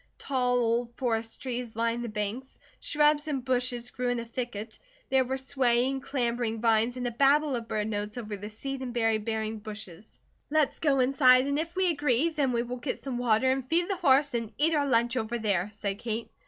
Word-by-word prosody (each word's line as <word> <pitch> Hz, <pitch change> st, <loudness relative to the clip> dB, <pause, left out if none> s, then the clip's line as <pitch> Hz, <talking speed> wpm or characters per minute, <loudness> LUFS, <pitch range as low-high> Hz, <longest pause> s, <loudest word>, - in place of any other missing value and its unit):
Tall 250 Hz, -2 st, 0 dB
old 235 Hz, 0 st, 0 dB
forest 225 Hz, -3 st, -2 dB
trees 245 Hz, -3 st, -4 dB
lined 230 Hz, +1 st, 0 dB
the 235 Hz, -, -4 dB
banks, 210 Hz, +5 st, -4 dB, 0.2 s
shrubs 295 Hz, 0 st, +2 dB
and 270 Hz, -5 st, -2 dB
bushes 245 Hz, -1 st, -1 dB
grew 250 Hz, 0 st, -2 dB
in 245 Hz, -1 st, 0 dB
a 235 Hz, -, -5 dB
thicket. 230 Hz, -2 st, -5 dB, 0.3 s
There 265 Hz, -1 st, +4 dB
were 260 Hz, +1 st, -2 dB
swaying, 265 Hz, -1 st, +1 dB
clambering 240 Hz, -4 st, -1 dB
vines 230 Hz, +2 st, +2 dB
and 250 Hz, -, -3 dB
a -, -, -2 dB
babel 280 Hz, +3 st, +3 dB
of 230 Hz, -1 st, -4 dB
bird 210 Hz, -1 st, -1 dB
notes 210 Hz, +1 st, -3 dB
over 215 Hz, -3 st, -5 dB
the 205 Hz, +1 st, -7 dB
seed 270 Hz, +5 st, -6 dB
and 245 Hz, -2 st, -5 dB
berry 225 Hz, -2 st, +2 dB
bearing 220 Hz, 0 st, -3 dB
bushes. 210 Hz, -2 st, -9 dB, 0.3 s
"Let's 305 Hz, -1 st, +1 dB
go 275 Hz, -4 st, +3 dB
inside, 255 Hz, -1 st, +5 dB
and 280 Hz, +1 st, 0 dB
if 335 Hz, +2 st, -4 dB
we 375 Hz, -1 st, +2 dB
agree, 290 Hz, -1 st, +2 dB
then 290 Hz, -5 st, 0 dB
we 235 Hz, -1 st, 0 dB
will 245 Hz, +1 st, -5 dB
get 255 Hz, +2 st, -4 dB
some 255 Hz, -3 st, -3 dB
water 245 Hz, +2 st, +3 dB
and 265 Hz, -1 st, -2 dB
feed 345 Hz, +4 st, +2 dB
the -, -, 0 dB
horse 280 Hz, -1 st, +3 dB
and 230 Hz, -2 st, -2 dB
eat 320 Hz, +3 st, +3 dB
our 290 Hz, -2 st, +2 dB
lunch 235 Hz, 0 st, +2 dB
over 230 Hz, 0 st, -2 dB
there," 200 Hz, -4 st, 0 dB
said 200 Hz, -1 st, -4 dB
Kate. 230 Hz, 0 st, -4 dB
245 Hz, 210 wpm, -28 LUFS, 225-270 Hz, 0.3 s, inside